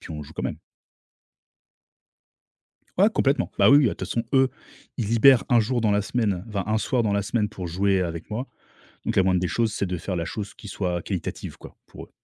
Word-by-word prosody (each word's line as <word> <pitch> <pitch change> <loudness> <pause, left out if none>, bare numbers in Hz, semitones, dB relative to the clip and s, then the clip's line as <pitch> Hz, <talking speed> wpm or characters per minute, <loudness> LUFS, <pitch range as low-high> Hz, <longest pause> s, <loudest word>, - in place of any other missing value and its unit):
puis - - -11
on 75 - -6
joue 75 +2 -13
quand - - -5
même. - - -3 2.4
Ouais, 200 +4 +5
complètement. 140 - +1
Bah, - - +6
oui. 140 - +8
Bah, - - +3
de 125 - +4
toute - - -5
façon, 115 - -1
eux, 130 -1 +5 0.5
ils 110 - -1
libèrent 120 +2 +6
un 120 -2 +5
jour 120 +2 0
dans 110 - +2
la 105 0 +2
semaine, 100 -4 -1
vin 100 -3 -3
un 110 +1 +1
soir 120 +1 0
dans 105 - 0
la 100 - +1
semaine, 105 0 -1
pour 95 -4 -6
jouer 95 +3 +1
avec 85 -2 -4
moi. 120 +5 -4 0.6
Donc, - - -1
la 95 - +5
moindre 90 -1 +2
des 90 - -1
choses, 115 +2 0
c'est 100 - -2
de 90 - -3
faire 90 +3 -4
la 85 - -2
chose 100 +4 -5
qui 105 - -12
soit 90 -4 -2
qualitative, 90 -1 -5
quoi, - - -13
pour - - -11
eux. - - -28
105 Hz, 230 wpm, -24 LUFS, 90-120 Hz, 2.4 s, oui